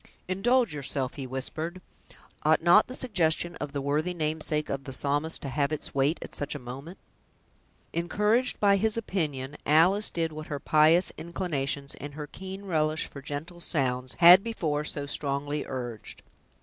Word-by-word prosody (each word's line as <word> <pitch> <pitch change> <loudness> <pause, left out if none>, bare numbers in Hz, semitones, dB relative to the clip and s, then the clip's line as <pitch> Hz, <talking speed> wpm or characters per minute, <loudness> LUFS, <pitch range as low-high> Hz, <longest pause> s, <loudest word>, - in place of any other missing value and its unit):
"Indulge 235 +4 +2
yourself," 140 -2 -2
he 135 -2 -6
whispered; 155 +7 -4 0.6
"ought 155 +1 +3
not 175 +5 +6
the 255 - -6
suggestion 175 -8 0
of 145 -1 -5
the 140 -1 -3
worthy 155 +6 0
namesake 155 -1 0
of 135 0 -4
the 135 - -5
Psalmist 145 +4 0
to 140 - -3
have 140 +2 0
its 155 - -4
weight 140 +4 +2
at - - -10
such 145 +1 -1
a - - -2
moment?" 135 +7 -9 1.0
Encouraged 210 +8 +1
by 200 -1 +5
his 220 +2 0
opinion, 150 -10 -3
Alice 180 +8 +4
did 165 -1 -2
what 155 0 -7
her 145 -2 -4
pious 155 +5 +4
inclinations, 145 -5 -3
and 145 +1 -8
her 150 -1 -5
keen 190 +6 -8
relish 155 -3 0
for 140 - -10
gentle 155 +5 -6
sounds, 130 -5 -1
had 180 +3 +9
before 155 -10 -1
so 145 -1 -4
strongly 145 +1 -2
urged. 120 -4 -6
155 Hz, 160 wpm, -28 LUFS, 140-175 Hz, 1.0 s, had